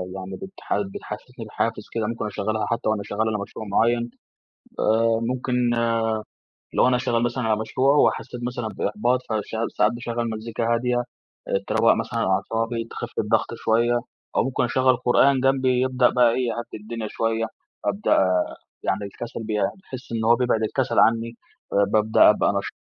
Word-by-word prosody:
يعني 95 0 -6
بتح 190 - -4 0.2
بتحسسني - - -8
بحافز - - -2
كده، 110 -2 -1
ممكن 115 -2 -3
أشغلها 110 +1 -2
حتى 115 -2 -1
وأنا 110 -2 0
شغال 110 +2 -1
على 105 - -1
مشروع 110 +2 -7
معين. 120 +3 +2 0.7
آآ، 115 +1 +3
ممكن 125 +2 -2 1.2
لو - - +4
أنا 125 -1 +3
شغال 120 -1 0
مثلًا 120 +1 -1
على 110 -1 +1
مشروع 130 +6 +2
وحسيت 125 -2 +1
مثلًا 120 -2 -3
بإحباط، 110 +5 0
فشع 110 +1 -2
ساعات 105 +2 +4
باشغل 120 -1 -3
مزيكا 115 +1 -2
هادية، 120 +1 +1 0.5
آآ، 100 - 0
تروق 110 +1 +4
مثلًا 115 +1 -3
أعصابي، 115 +4 -1
تخف - - -5
الضغط - - +1
شويّة، 120 +2 +2 0.4
أو - - +3
ممكن 130 -1 -1
أشغل 130 +2 +3
قرآن 130 +2 +4
جنبي 130 -1 +2
يبدأ 130 -1 +3
بقى 125 -1 +4
إيه، 125 0 0
يهدي 120 0 -4
الدنيا 110 0 -5
شوية. 115 0 0 0.4
أبدأ 100 -2 +2 0.5
يعني 100 +4 -1
الكسل 115 +3 -7
بي 110 0 -3
باحس 130 - -5
إن 115 -1 -1
هو 120 +1 +6
بيبعد 120 -3 +1
الكسل 110 - 0
عنّي. 115 +1 +3 0.4
آآ، 100 0 +4
بابدأ 110 0 +5
أبقى - - +3
نشيط - - -3
115 Hz, 160 wpm, -24 LUFS, 110-125 Hz, 1.2 s, هو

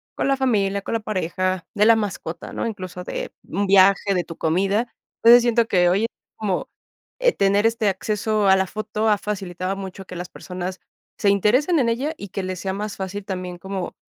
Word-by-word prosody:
con - - 0
la 275 - +2
familia, 200 -7 +1
con - - -5
la 230 - +1
pareja, 185 -3 -2
de 210 - +3
la 230 0 +6
mascota, 195 -6 -4
¿no? - - -2
Incluso 185 -4 -6
de - - -5
un 200 +3 -2
viaje, 195 +1 +5
de 180 -2 0
tu 165 - -10
comida. 195 +8 +1 0.4
Entonces 240 +1 +9
siento 235 -1 +2
que 180 -4 +3
hoy 195 +5 +2
es, - - +2 0.3
como, 200 -4 -2 0.5
eh, - - +4
tener 200 +2 +2
este 225 -2 0
acceso 210 +2 0
a 190 - +7
la 190 0 +1
foto 215 +2 -2
ha 210 - +4
facilitado 190 -2 -3
mucho 195 0 -7
que 180 - -9
las 175 0 -6
personas 185 0 -6 0.4
se 205 - +3
interesen 245 - +3
en 250 - +2
ella 265 +7 -1
y 200 - -8
que 195 - -4
les 185 -1 -4
sea 190 0 -3
más 205 +1 -4
fácil 195 +1 -5
también 185 -2 -5
como 190 0 -5
200 Hz, 205 wpm, -22 LUFS, 185-215 Hz, 0.5 s, Entonces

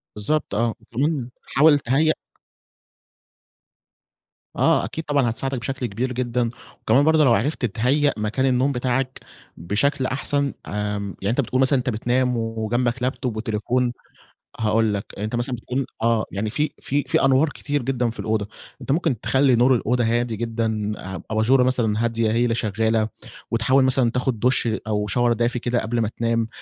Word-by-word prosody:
بالضبط 105 +1 0
آه، 115 0 0
وكمان 135 +1 -2
حاول 150 0 +4
تهيّأ 145 +5 +2 2.4
آه، - - +3
أكيد 160 - -5
طبعًا 140 -5 +1
هتساعدَك 135 +3 -3
بشكل 130 +2 -3
كبير 120 +4 -2
جدًا، 120 -1 -1 0.3
وكمان 125 +6 +3
برضه 160 0 +4
لو 120 - +5
عرفت 145 +6 0
تتهيّأ 130 +7 +1
مكان 110 +5 -1
النوم 130 +1 +2
بتاعَك 130 0 -1 0.4
بشكل 105 - 0
أحسن، 140 +1 -1
آمم، 105 -1 -3
يعني 100 - -1
أنت 125 +5 +2
بتقول 130 +1 -1
مثلًا 135 0 +3
أنت 125 - -2
بتنام 125 +2 0
وجنبَك 115 +2 -1
لابتوب 125 -2 -2
وتليفون 120 +3 0 0.7
هاقول 110 0 +2
لَك 100 -1 -3
أنت 105 +3 -3
مثلًا 120 +2 -1
بتكون 125 +3 -3 0.2
آه، 115 -1 +2
يعني 105 +2 -2
في 150 +7 0
في 145 +1 -1
في - - +2
أنوار 135 +3 +4
كتير 145 0 -3
جدًا 125 -1 0
في 115 - -9
الأوضة، 110 -2 -1 0.3
أنت - - -3
ممكن 140 - +1
تخلّي 130 +4 +3
نور 125 +2 +4
الأوضة 120 +1 +1
هادي 120 0 0
جدًا 110 -2 -2 0.2
أ - - -6
أباجورة 115 +4 +3
مثلًا 115 -4 +1
هادية 115 -1 0
هي 115 +2 +2
اللي 115 -2 +1
شغالة 110 0 0 0.4
وتحاول 130 +4 +3
مثلًا 130 -2 +2
تاخد 125 -2 -1
دُش 125 +1 +2 0.2
أو 105 -1 -1
شاور 120 +3 +2
دافي 120 +2 0
كده 120 0 0
قبل 115 +2 -2
ما 110 - +1
تنام 115 -1 0
120 Hz, 160 wpm, -22 LUFS, 110-130 Hz, 2.4 s, لو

